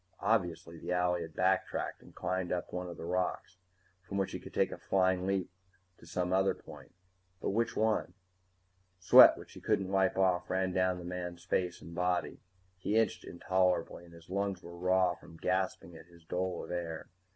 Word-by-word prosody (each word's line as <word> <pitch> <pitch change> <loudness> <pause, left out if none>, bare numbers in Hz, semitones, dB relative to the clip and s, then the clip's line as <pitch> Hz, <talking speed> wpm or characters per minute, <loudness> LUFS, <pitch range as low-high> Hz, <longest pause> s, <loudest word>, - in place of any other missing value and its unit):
Obviously 90 -6 0
the 85 - -5
owlie 90 -1 +1
had 80 -1 -8
backtracked - - 0
and - - -17
climbed 95 -1 -2
up 90 -1 -3
one 90 0 -3
of 85 - -8
those - - -7
rocks, 90 +1 -2 0.4
from 100 - -5
which 95 -1 0
he - - -5
could - - -11
take - - +1
a - - -7
flying 95 -1 +1
leap 95 -2 -1 0.5
to 85 - -15
some 90 +1 -1
other 95 +1 +3
point. - - -13 0.4
But - - -1
which 115 +3 0
one? 110 0 +1 0.8
Sweat 90 - +9
which - - -12
he - - -11
couldn't 95 -1 0
wipe 95 -1 +2
off 90 -2 +2
ran 95 0 0
down 95 0 +2
the 90 - -8
man's 90 -1 -5
face 90 -1 -1
and 85 - -10
body. 90 0 -1 0.4
He 105 - -1
itched 115 - +1
intolerably, 90 0 0
and 85 - -16
his 85 0 -15
lungs 100 -1 -1
were 85 0 -9
raw 90 0 +2
from 85 -1 -14
gasping 90 -1 -1
at 80 - -13
his 85 -1 -19
dole 90 0 -2
of - - -8
air. 85 -2 -4
90 Hz, 190 wpm, -32 LUFS, 85-95 Hz, 0.8 s, Sweat